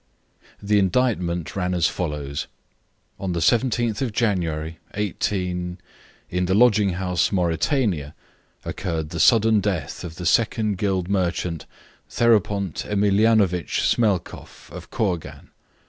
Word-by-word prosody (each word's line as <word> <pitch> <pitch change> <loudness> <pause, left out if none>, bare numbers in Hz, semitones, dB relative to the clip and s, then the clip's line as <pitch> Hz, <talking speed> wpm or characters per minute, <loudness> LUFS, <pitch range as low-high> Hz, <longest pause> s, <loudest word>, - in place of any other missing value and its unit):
The 105 0 +3
indictment 90 -5 0
ran 90 -2 -1
as 85 -2 +2
follows: 75 -5 -3 0.7
On 95 -2 -2
the 85 - -1
17th 120 - +1
of 130 -4 -1
January, 85 -8 -1 0.2
18, 90 -3 -2 0.5
in 90 +1 0
the 95 - +2
lodging 105 -4 +4
house 90 -1 0
Mauritania, 90 - 0 0.5
occurred 80 -5 -3
the 85 - -4
sudden 110 +6 +5
death 95 -8 -3
of 80 -2 -7
the 90 - -7
Second 105 0 +1
Guild 95 -3 0
merchant, 90 -4 -1 0.4
Therapont 105 -6 +1
Emilianovich 100 -3 +2
Smelkoff, 100 -7 -1
of - - -10
Kourgan. 90 -7 -3
95 Hz, 115 wpm, -23 LUFS, 85-105 Hz, 0.7 s, sudden